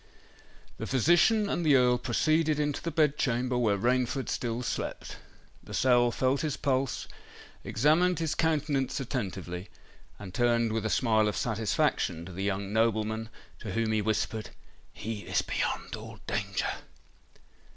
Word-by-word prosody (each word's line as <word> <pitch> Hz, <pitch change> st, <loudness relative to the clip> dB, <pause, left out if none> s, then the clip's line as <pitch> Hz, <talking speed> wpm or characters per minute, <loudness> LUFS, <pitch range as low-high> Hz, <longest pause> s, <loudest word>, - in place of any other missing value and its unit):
The -, -, -4 dB
physician 175 Hz, -, +4 dB
and 175 Hz, -, -1 dB
the 150 Hz, -3 st, +5 dB
Earl 125 Hz, -1 st, +4 dB
proceeded 155 Hz, +5 st, +1 dB
into 145 Hz, -1 st, -1 dB
the 170 Hz, -, -2 dB
bed 150 Hz, -2 st, +2 dB
chamber, 125 Hz, 0 st, 0 dB
where 110 Hz, -5 st, +2 dB
Rainford 125 Hz, +4 st, 0 dB
still 120 Hz, 0 st, -2 dB
slept. -, -, -4 dB, 0.5 s
Lascelles 120 Hz, -2 st, +2 dB
felt 130 Hz, +1 st, +1 dB
his 155 Hz, -4 st, -2 dB
pulse, 135 Hz, -1 st, -1 dB, 0.6 s
examined 160 Hz, +8 st, +3 dB
his 160 Hz, -2 st, -1 dB
countenance 150 Hz, -4 st, 0 dB
attentively, 100 Hz, -8 st, -4 dB, 0.5 s
and 95 Hz, -3 st, -9 dB
turned 115 Hz, 0 st, +2 dB
with 110 Hz, -1 st, -1 dB
a -, -, -3 dB
smile 110 Hz, -3 st, +3 dB
of 105 Hz, -, -2 dB
satisfaction 105 Hz, -6 st, 0 dB
to 95 Hz, -, -9 dB
the 95 Hz, +2 st, -5 dB
young 100 Hz, 0 st, -2 dB
nobleman, 110 Hz, 0 st, 0 dB, 0.3 s
to 105 Hz, -5 st, -6 dB
whom 115 Hz, -1 st, 0 dB
he 110 Hz, -1 st, +1 dB
whispered, 110 Hz, +1 st, -1 dB, 0.4 s
"He 110 Hz, 0 st, -5 dB
is -, -, -1 dB
beyond -, -, -2 dB
all 110 Hz, 0 st, -10 dB
danger." 100 Hz, -1 st, -1 dB
120 Hz, 140 wpm, -29 LUFS, 110-140 Hz, 0.6 s, the